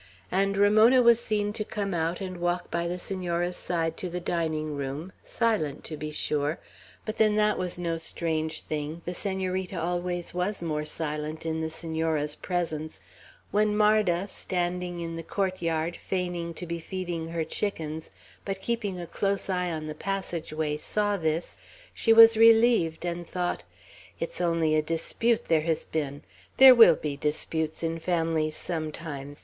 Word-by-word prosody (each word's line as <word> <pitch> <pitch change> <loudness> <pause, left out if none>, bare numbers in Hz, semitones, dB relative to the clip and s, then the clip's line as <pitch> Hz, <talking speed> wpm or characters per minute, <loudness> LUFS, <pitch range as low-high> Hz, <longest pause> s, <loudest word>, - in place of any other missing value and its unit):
and 195 +1 +1
Ramona 215 +5 +6
was 235 -1 +5
seen 210 -1 0
to 215 - -2
come 200 -2 -3
out 165 +2 -1
and 185 -2 -5
walk 175 0 -1
by 170 0 -1
the 175 +1 -2
Senora's 180 -1 -2
side 165 -2 -2
to 185 - -3
the 180 +1 -3
dining 160 -3 -2
room; 140 +6 -4
silent, 210 - 0
to 155 - -5
be 150 0 -5
sure, 150 0 -1 0.5
but 215 0 -5
then 215 -1 +4
that 210 0 +3
was 180 -1 -2
no 170 -2 -2
strange 160 -1 -2
thing, 155 +2 -4
the 175 - -3
Senorita 190 -1 -2
always 175 +1 -2
was 180 +1 -2
more 150 -2 -2
silent 150 0 -3
in 160 0 -1
the 160 - -2
Senora's 160 -2 -1
presence, 160 -3 -3 0.5
when 210 +1 +2
Marda, 210 -4 +3
standing 180 -2 -3
in 165 0 -4
the - - -4
court 185 +2 -2
yard, 165 0 -1
feigning 175 -3 -3
to 175 - -5
be 170 0 -4
feeding 175 -2 -4
her 165 0 -2
chickens, 160 -2 -3 0.3
but 195 -1 -4
keeping 205 -3 -2
a 175 - -5
close 195 +2 -1
eye 180 -1 0
on 155 -1 -4
the 155 - -4
passage 180 -1 -4
ways, 155 -1 -2
saw 205 -1 0
this, 160 -2 -2 0.4
she 225 - +2
was 225 0 +9
relieved, 225 -7 +5
and 175 0 -3
thought: 175 - -2 0.6
"It's 165 +1 -3
only 165 -2 +2
a 155 - +4
dispute 165 +9 0
there 160 -2 +3
has 160 0 -1
been. 145 -2 -3 0.3
There 265 -1 +11
will 225 -9 +8
be 150 -2 -4
disputes 155 +2 -2
in 165 0 -1
families 165 -2 0
sometimes. 155 -4 -5
170 Hz, 165 wpm, -27 LUFS, 160-195 Hz, 0.6 s, There